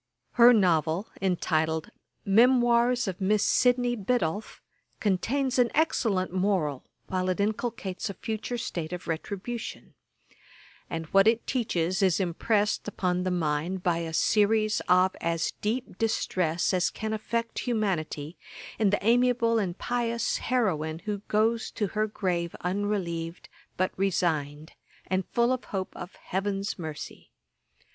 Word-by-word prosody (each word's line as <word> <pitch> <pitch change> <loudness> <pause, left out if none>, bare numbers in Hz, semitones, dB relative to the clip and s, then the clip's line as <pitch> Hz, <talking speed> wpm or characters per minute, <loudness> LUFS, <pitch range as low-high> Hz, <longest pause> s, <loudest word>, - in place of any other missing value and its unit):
Her 240 +1 +7
novel, 175 -3 +2
entitled 160 -4 0 0.3
Memoirs 240 +2 +4
of 190 0 -4
Miss 205 +2 +2
Sydney 245 -1 +3
Biddulph, 205 -3 -1 0.4
contains 255 +7 0
an 245 -1 +4
excellent 220 - +1
moral 185 -8 0 0.2
while 185 0 -1
it 185 - -1
inculcates 210 -2 -2
a 200 - -6
future 220 +5 -4
state 170 -7 -4
of 180 - -6
retribution; 200 +8 -5 1.0
and 165 -1 -4
what 195 +1 +6
it 225 +1 +3
teaches 190 -7 0
is 190 -2 +3
impressed 205 +5 0
upon 180 -3 -1
the 185 - -1
mind 175 +1 -1
by 170 -2 +1
a 165 -1 -4
series 215 +5 +2
of 185 +1 +4
as 165 0 0
deep 225 -2 -3
distress 180 -7 0
as 180 -1 +2
can 220 0 -4
affect 230 +2 -2
humanity, 180 - -2 0.4
in 215 -3 +4
the 205 0 -1
amiable 235 -1 +3
and 185 -3 -2
pious 235 -1 -1
heroine 160 -11 0
who 210 -1 -2
goes 220 +2 +1
to 210 - -2
her 215 +2 0
grave 180 -5 -2
unrelieved, 180 -3 -2 0.3
but 185 +1 +1
resigned, 160 -5 -1 0.3
and 185 -1 -1
full 240 +1 +2
of 255 - -4
hope 190 -2 -4
of 180 - -8
'heaven's 195 +1 -3
mercy.' 155 -3 -7
195 Hz, 130 wpm, -27 LUFS, 175-225 Hz, 1.0 s, Her